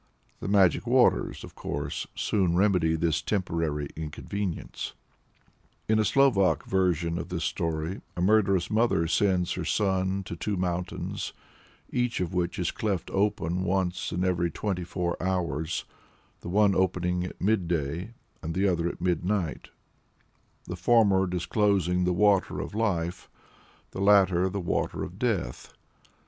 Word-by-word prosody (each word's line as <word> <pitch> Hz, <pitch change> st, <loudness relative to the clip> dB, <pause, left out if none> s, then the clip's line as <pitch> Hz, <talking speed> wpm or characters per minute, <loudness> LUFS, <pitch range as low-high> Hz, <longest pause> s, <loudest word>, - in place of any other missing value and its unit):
The -, -, -5 dB
magic 95 Hz, -4 st, +3 dB
waters, -, -, +3 dB
of -, -, -10 dB
course, 70 Hz, 0 st, -4 dB
soon 95 Hz, -5 st, +1 dB
remedy 90 Hz, -4 st, +3 dB
this 80 Hz, 0 st, 0 dB
temporary 80 Hz, -5 st, -1 dB
inconvenience. 80 Hz, +4 st, -5 dB, 0.9 s
In 110 Hz, 0 st, +3 dB
a -, -, +4 dB
Slovak 130 Hz, -9 st, +3 dB
version 85 Hz, -3 st, +1 dB
of 85 Hz, -, -6 dB
this 85 Hz, -2 st, -3 dB
story, 80 Hz, +3 st, -2 dB, 0.2 s
a -, -, -1 dB
murderous 95 Hz, -2 st, +3 dB
mother 110 Hz, -6 st, +2 dB
sends 90 Hz, +1 st, +1 dB
her 90 Hz, -, -4 dB
son 95 Hz, +1 st, 0 dB
to 85 Hz, -, -6 dB
two 100 Hz, +4 st, -2 dB
mountains, 90 Hz, 0 st, -3 dB, 0.6 s
each 125 Hz, -1 st, 0 dB
of 90 Hz, -2 st, -2 dB
which 90 Hz, 0 st, -1 dB
is 90 Hz, -3 st, 0 dB
cleft 100 Hz, -5 st, -2 dB
open 95 Hz, -3 st, 0 dB
once 95 Hz, -1 st, -1 dB
in 90 Hz, +1 st, -1 dB
every 90 Hz, -2 st, +1 dB
twenty 90 Hz, +2 st, -3 dB
four 85 Hz, 0 st, -3 dB
hours 85 Hz, -3 st, -1 dB, 0.5 s
the -, -, -8 dB
one 100 Hz, +1 st, +4 dB
opening 90 Hz, -1 st, +1 dB
at 90 Hz, -, -7 dB
midday 90 Hz, -1 st, -1 dB, 0.3 s
and 80 Hz, +1 st, -4 dB
the 100 Hz, +2 st, +2 dB
other 85 Hz, -2 st, +1 dB
at -, -, -9 dB
midnight; 90 Hz, -1 st, -1 dB, 1.0 s
the 90 Hz, -, -5 dB
former 95 Hz, 0 st, +4 dB
disclosing 90 Hz, 0 st, +1 dB
the 90 Hz, -, +2 dB
Water 100 Hz, +1 st, +2 dB
of -, -, -5 dB
Life, 90 Hz, -6 st, -1 dB, 0.6 s
the 95 Hz, -, -5 dB
latter 95 Hz, -2 st, +4 dB
the 100 Hz, +1 st, -3 dB
Water 85 Hz, -, -1 dB
of -, -, -8 dB
Death. -, -, -2 dB
90 Hz, 140 wpm, -27 LUFS, 85-100 Hz, 1.0 s, a